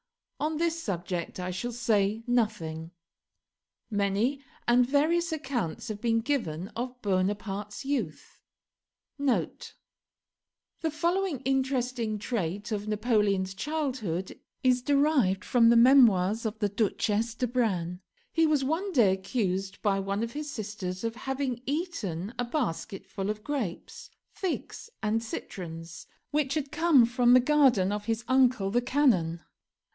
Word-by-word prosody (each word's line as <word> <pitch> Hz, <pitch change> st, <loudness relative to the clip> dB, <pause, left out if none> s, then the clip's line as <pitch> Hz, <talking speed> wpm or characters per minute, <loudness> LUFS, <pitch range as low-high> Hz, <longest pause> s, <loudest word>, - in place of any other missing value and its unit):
On 310 Hz, +1 st, -1 dB
this 330 Hz, 0 st, 0 dB
subject 180 Hz, -, -4 dB
I 180 Hz, 0 st, -3 dB
shall 240 Hz, +7 st, -3 dB
say 220 Hz, -2 st, +1 dB
nothing. 210 Hz, -10 st, -1 dB, 1.0 s
Many 205 Hz, +7 st, +1 dB, 0.3 s
and 245 Hz, +1 st, +5 dB
various 315 Hz, +6 st, +2 dB
accounts 245 Hz, -, -3 dB
have 210 Hz, -1 st, -5 dB
been 230 Hz, -1 st, +2 dB
given 200 Hz, -, -2 dB
of 250 Hz, +2 st, -5 dB
Bonaparte's 205 Hz, +3 st, -2 dB
youth. 240 Hz, -, -3 dB, 0.8 s
[The 280 Hz, -3 st, +2 dB, 1.4 s
following 340 Hz, 0 st, 0 dB
interesting 255 Hz, -4 st, 0 dB
trait 205 Hz, -2 st, -3 dB
of 210 Hz, -1 st, -2 dB
Napoleon's 210 Hz, -3 st, +1 dB
childhood 250 Hz, -, -3 dB, 0.2 s
is 255 Hz, -1 st, +3 dB
derived 275 Hz, -8 st, +2 dB
from 235 Hz, -2 st, +5 dB
the 235 Hz, -, +6 dB
'Memoirs 230 Hz, -4 st, +5 dB
of 215 Hz, 0 st, -5 dB
the 210 Hz, -2 st, 0 dB
Duchesse 215 Hz, +2 st, 0 dB
d'Arbranes': 220 Hz, -9 st, -1 dB, 0.3 s
"He 325 Hz, -1 st, +3 dB
was 300 Hz, -3 st, +2 dB
one 330 Hz, +8 st, -1 dB
day 215 Hz, -, +5 dB
accused 195 Hz, -1 st, -2 dB
by 195 Hz, -2 st, +2 dB
one 200 Hz, +2 st, -2 dB
of 230 Hz, -, -3 dB
his 300 Hz, +2 st, -5 dB
sisters 205 Hz, -6 st, -5 dB
of 230 Hz, 0 st, -2 dB
having 265 Hz, -1 st, -3 dB
eaten 245 Hz, -, -3 dB
a 245 Hz, -, +1 dB
basketful 205 Hz, -, -3 dB
of 215 Hz, 0 st, -3 dB
grapes, 240 Hz, -11 st, -4 dB, 0.2 s
figs, 380 Hz, +4 st, -4 dB
and 220 Hz, +1 st, +1 dB
citrons, 165 Hz, -7 st, -7 dB, 0.2 s
which 290 Hz, -2 st, 0 dB
had 290 Hz, -2 st, -2 dB
come 320 Hz, -7 st, +5 dB
from 245 Hz, +1 st, +3 dB
the 255 Hz, -, +8 dB
garden 255 Hz, -8 st, +4 dB
of 210 Hz, 0 st, -3 dB
his 225 Hz, +1 st, -1 dB
uncle 255 Hz, -6 st, +3 dB
the 240 Hz, +3 st, +2 dB
Canon. 225 Hz, -, +2 dB
230 Hz, 130 wpm, -28 LUFS, 195-270 Hz, 1.4 s, the